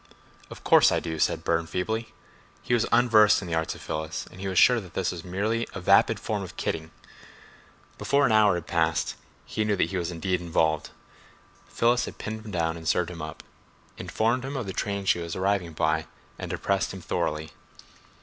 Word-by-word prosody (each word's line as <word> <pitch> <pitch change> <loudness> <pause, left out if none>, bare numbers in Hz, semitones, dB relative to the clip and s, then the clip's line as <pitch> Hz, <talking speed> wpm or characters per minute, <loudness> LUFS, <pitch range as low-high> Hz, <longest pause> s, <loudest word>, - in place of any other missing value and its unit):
"Of - - -11
course - - +6
I - - +2
do," 80 -2 -5
said 80 0 +1
Burne 85 0 0
feebly. 110 +7 -3 0.5
He - - -1
was 120 -2 +2
unversed 110 -3 +5
in - - -7
the 85 - -4
arts 80 0 -1
of - - -12
Phyllis, 80 0 -4
and 95 - -10
was 95 -2 -2
sure 120 +5 +6
that 90 -3 -14
this 95 - 0
was 85 -2 -7
merely 105 +6 -1
a - - -3
vapid 90 - +4
form - - -3
of - - -9
kidding. 80 0 -3 1.1
Before 140 0 +2
an 120 - +2
hour 105 -3 +5
had 85 -2 -4
passed 80 -2 0 0.3
he 110 - -2
knew 105 -1 +1
that 100 - 0
he 95 - -2
was 85 -2 -2
indeed 90 +1 -2
involved. 80 -2 0 0.8
Phyllis 120 +1 +2
had - - -9
pinned 110 0 -6
him - - -7
down 85 -2 -1
and 80 -1 -8
served 90 +1 +1
him 85 -3 -8
up, 80 -1 -7 0.5
informed 115 +3 -1
him 135 +2 -5
the 110 -8 -3
train 100 0 -3
she 90 - +3
was 85 -1 -5
arriving 95 -3 0
by, 80 0 0 0.3
and - - -5
depressed 100 -1 -1
him 95 - -9
thoroughly. 80 -1 -2
90 Hz, 200 wpm, -26 LUFS, 80-110 Hz, 1.1 s, course